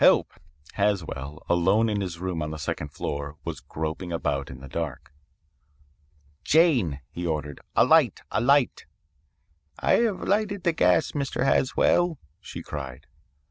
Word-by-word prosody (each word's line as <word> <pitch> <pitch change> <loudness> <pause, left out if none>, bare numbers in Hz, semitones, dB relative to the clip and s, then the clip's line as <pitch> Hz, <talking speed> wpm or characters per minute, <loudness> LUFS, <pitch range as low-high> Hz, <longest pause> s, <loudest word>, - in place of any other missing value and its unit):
Help!' - - +5 0.4
Haswell, 80 -8 -2
alone 95 +6 +3
in 105 -2 0
his 90 -3 -4
room 90 -2 -3
on 75 - -2
the 80 - -5
second 75 0 -3
floor, 70 +1 -4
was - - -4
groping 80 +3 -5
about 70 -4 -1
in 65 - -9
the 70 - -10
dark. 70 -1 -5 1.3
"'Jane,' 125 - +3
he 85 0 -4
ordered, 75 -3 -3
'a - - +6
light - - +4
a 110 - +1
light.' 140 +1 +3 0.9
"'I - - 0
have 225 -5 0
lighted 205 -2 0
the 170 - +2
gas, 90 - +3
Mr. 135 -3 -1
Haswell,' 165 +5 +3 0.2
she - - -8
cried. 70 -2 -7
85 Hz, 140 wpm, -26 LUFS, -, 1.3 s, a